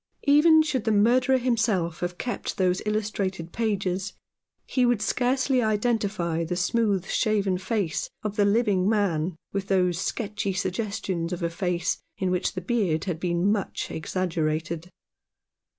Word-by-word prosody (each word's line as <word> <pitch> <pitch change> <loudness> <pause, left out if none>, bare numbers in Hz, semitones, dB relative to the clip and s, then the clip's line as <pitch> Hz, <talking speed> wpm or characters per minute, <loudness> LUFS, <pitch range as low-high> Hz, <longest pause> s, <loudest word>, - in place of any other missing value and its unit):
Even 315 +2 +6
should 265 -7 -2
the 220 - +2
murderer 250 +5 +4
himself 220 -9 0
have 175 0 -3
kept 245 - -4
those 185 -1 +1
illustrated 200 -5 -2
pages, 200 -4 -1 0.5
he 255 - +1
would 240 -3 +3
scarcely 255 +4 +1
identify 210 -6 0
the 175 +2 -2
smooth 195 +1 +1
shaven 200 -2 +1
face 195 -4 -2
of 210 -1 -3
the 210 - +3
living 200 -2 +2
man 185 -6 +1 0.2
with 195 0 -2
those 180 -3 +2
sketchy 205 -1 -2
suggestions 185 -2 -2
of 175 -1 -4
a 170 - 0
face 170 -1 -1 0.2
in 185 -1 0
which 180 0 0
the 185 - -4
beard 185 -6 0
had 175 -4 -3
been 175 +2 +1
much 205 -3 -2
exaggerated. 165 -1 -2
195 Hz, 140 wpm, -26 LUFS, 175-220 Hz, 0.5 s, Even